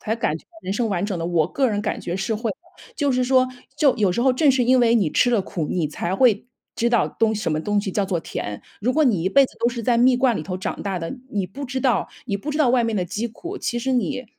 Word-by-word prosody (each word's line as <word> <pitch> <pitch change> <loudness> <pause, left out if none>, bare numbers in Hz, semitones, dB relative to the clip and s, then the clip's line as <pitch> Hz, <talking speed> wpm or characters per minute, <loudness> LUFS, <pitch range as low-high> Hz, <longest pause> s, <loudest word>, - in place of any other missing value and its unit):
才 220 - -1
感 160 -9 -1
觉 - - -22 0.2
人 190 - -3
生 225 +3 0
完 195 -2 -1
整 200 -4 -3
的， 165 - -2
我 170 -3 +2
个 265 +6 +1
人 205 -2 -1
感 210 - -2
觉 175 - -4
是 195 +4 -1
会， 220 +1 -2 0.5
就 285 -2 +1
是 255 -1 +1
说 255 0 +3 0.3
就 285 -5 +3
有 200 -5 +2
时 235 - -1
候 260 0 +4
正 280 +3 +4
是 260 -1 +2
因 255 +2 +4
为 235 -1 +4
你 195 -9 +2
吃 245 - +3
了 235 -4 +3
苦， 170 -4 -4
你 165 -4 -1
才 170 +4 -3
会 235 -1 +3 0.3
知 235 - +2
道 235 - +3
东 220 -1 +1
什 210 -5 -2
么 155 - 0
东 205 +4 0
西 200 -1 -4
叫 200 +2 0
做 185 -3 -1
甜。 105 -9 -5 0.2
如 240 +5 +1
果 310 +3 +3
你 210 - +2
一 185 - +1
辈 275 +7 +5
子 - - -9
都 235 - +3
是 240 -1 -4
在 235 +1 +2
蜜 250 +1 +5
罐 250 -3 +2
里 - - -3
头 180 +3 -4
长 185 - -4
大 195 -2 -2
的， 165 +10 -5
你 200 -3 -1
不 245 +10 -7
知 260 0 -3
道 240 -8 +1 0.2
你 200 -4 -1
不 200 +10 -5
知 300 - -3
道 300 -5 +4
外 245 -1 +3
面 225 -1 -1
的 185 - 0
饥 205 +6 -3
苦。 345 - -8
其 240 - -2
实 260 +2 -1
你 255 +1 -1
225 Hz, 315 characters per minute, -22 LUFS, 190-255 Hz, 0.5 s, 辈